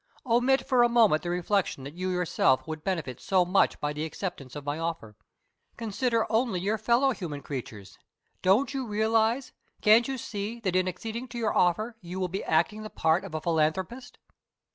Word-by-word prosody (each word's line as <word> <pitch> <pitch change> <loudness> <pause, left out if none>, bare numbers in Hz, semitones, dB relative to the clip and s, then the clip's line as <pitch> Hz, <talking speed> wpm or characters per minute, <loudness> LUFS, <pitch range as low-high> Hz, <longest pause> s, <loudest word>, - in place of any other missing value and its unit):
Omit 255 +3 +2
for 255 -3 +4
a 240 - +5
moment 225 -10 +4
the 175 - -4
reflection 180 -4 0
that 140 +2 -8
you 185 +2 -3
yourself 180 -7 +1
would 155 -1 -6
benefit 165 -10 -3
so 185 -2 +2
much 185 +3 +2
by 150 0 -2
the 150 +1 -4
acceptance 155 -4 -6
of 145 -1 -7
my 145 +2 -2
offer. 165 -11 -4 0.6
Consider 230 +1 0
only 225 -4 +1
your 210 +4 -1
fellow 240 +5 +3
human 160 - -5
creatures. 105 -8 -7 0.4
Don't 235 +10 +3
you 265 -3 -3
realize 225 +4 +1 0.3
can't 220 +3 +5
you 270 -1 -3
see 220 0 -5
that 185 -4 -1
in 185 0 +2
acceding 225 +7 -5
to 240 -2 -4
our 215 - 0
offer 215 +6 +1
you 180 +1 -6
will 185 -1 -1
be 190 +3 -4
acting 170 +7 +1
the 215 - -7
part 160 0 +1
of 185 -5 -7
a 155 - -2
philanthropist?" 170 +10 -1
190 Hz, 185 wpm, -28 LUFS, 165-230 Hz, 0.6 s, a